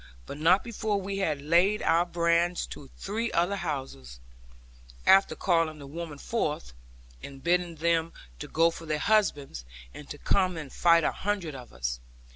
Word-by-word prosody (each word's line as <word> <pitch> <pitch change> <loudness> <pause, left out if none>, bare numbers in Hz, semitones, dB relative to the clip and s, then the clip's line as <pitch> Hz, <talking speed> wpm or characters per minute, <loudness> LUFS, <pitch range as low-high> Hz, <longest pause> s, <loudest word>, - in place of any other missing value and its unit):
But 140 - -8
not 180 +5 +4
before 220 -3 -2
we 195 +1 -4
had 150 -7 -1
laid 175 +7 +3
our 170 +2 +3
brands 170 +1 +1
to 140 - -12
three 225 +4 -3
other 175 +4 +1
houses, 135 - -5 0.9
after 195 0 +5
calling 165 -4 +1
the 145 - -10
women 155 +1 -7
forth, 150 - -3 0.5
and 135 -1 -10
bidding 175 0 +1
them 165 +1 +1 0.4
go 165 +1 +4
for 165 0 -10
their 155 0 0
husbands, 150 - +1 0.3
and 145 - -11
to 145 - -7
come 185 +2 +1
and 150 -4 -7
fight 170 -1 +4
a - - +2
hundred 195 -6 -3
of 125 -2 -10
us. - - -3
170 Hz, 160 wpm, -28 LUFS, 145-185 Hz, 0.9 s, after